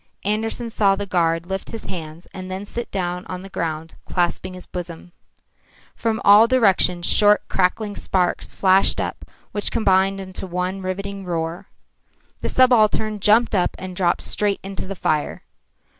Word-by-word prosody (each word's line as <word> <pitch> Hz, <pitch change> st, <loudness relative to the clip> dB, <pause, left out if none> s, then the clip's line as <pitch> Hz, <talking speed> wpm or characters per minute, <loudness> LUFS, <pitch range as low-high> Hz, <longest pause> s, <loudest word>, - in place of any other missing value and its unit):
Andersen 225 Hz, +3 st, -1 dB
saw 200 Hz, -3 st, +3 dB
the 205 Hz, -, -4 dB
guard 165 Hz, -3 st, +1 dB
lift 190 Hz, +1 st, -5 dB
his 225 Hz, -, -7 dB
hands 165 Hz, -1 st, -8 dB
and 185 Hz, 0 st, -7 dB
then 190 Hz, +2 st, -5 dB
sit 235 Hz, +3 st, -5 dB
down 180 Hz, -2 st, -3 dB
on 185 Hz, 0 st, -6 dB
the 195 Hz, -, -11 dB
ground 165 Hz, -2 st, -4 dB
clasping 180 Hz, +1 st, -1 dB
his 180 Hz, -, -10 dB
bosom. 175 Hz, -1 st, -8 dB, 0.8 s
From 225 Hz, -1 st, -1 dB
all 205 Hz, +3 st, +8 dB
directions 195 Hz, -8 st, +3 dB
short, 210 Hz, +2 st, +4 dB
crackling 205 Hz, +3 st, 0 dB
sparks 180 Hz, -2 st, -1 dB
flashed 190 Hz, 0 st, +4 dB
up -, -, -4 dB, 0.3 s
which 205 Hz, -, -1 dB
combined 195 Hz, -2 st, +2 dB
into 190 Hz, 0 st, -6 dB
one 180 Hz, +2 st, -3 dB
riving 195 Hz, +1 st, -4 dB
roar. 165 Hz, -1 st, -4 dB, 0.7 s
The -, -, -3 dB
subaltern 220 Hz, -4 st, +3 dB
jumped 220 Hz, +4 st, +4 dB
up 185 Hz, -3 st, +1 dB
and 185 Hz, -1 st, -7 dB
dropped 180 Hz, -2 st, +1 dB
straight 205 Hz, -1 st, 0 dB
into 195 Hz, -1 st, -6 dB
the 195 Hz, -, -5 dB
fire. 155 Hz, -4 st, -1 dB
190 Hz, 155 wpm, -21 LUFS, 180-205 Hz, 0.8 s, all